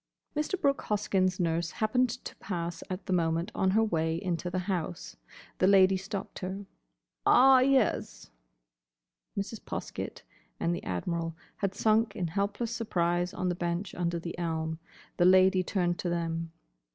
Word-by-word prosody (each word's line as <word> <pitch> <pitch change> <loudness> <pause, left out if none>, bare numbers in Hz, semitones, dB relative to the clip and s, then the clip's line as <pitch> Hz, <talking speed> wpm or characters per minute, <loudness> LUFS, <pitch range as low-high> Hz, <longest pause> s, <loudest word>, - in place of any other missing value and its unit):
Mr. 305 +5 -1
Brooke 280 -5 +2
Hoskyn's 190 -3 +1
nurse 165 -1 0
happened 250 +5 +1
to 240 +2 -7
pass 170 -3 -4
at 185 +1 -5
the 185 - -1
moment 165 +2 +1
on 190 - +1
her 220 +4 +4
way 165 -5 0
into 180 -2 -2
the 180 - -3
house. 175 - -3 0.4
The 185 - +4
Lady 190 -1 +6
stopped 195 +1 -5
her. 190 +2 -5 0.6
"Ah, 265 - +7
yes." 260 - +1 1.1
Mrs. 200 +2 -3
Poskett - - -5 0.4
and 170 - +1
the - - -4
Admiral 165 - -2 0.2
had 195 -1 -2
sunk 220 -1 +2
in 180 -5 -2
helpless 205 +6 -1
surprise 175 -5 0
on 185 - -2
the - - +1
bench 175 +2 -3
under 170 -1 -1
the 170 0 -5
elm. 160 -1 -2 0.4
The 175 - +4
Lady 185 +1 +6
turned 175 -2 0
to 180 - -1
them. 165 -1 -2
185 Hz, 150 wpm, -29 LUFS, 170-205 Hz, 1.1 s, Ah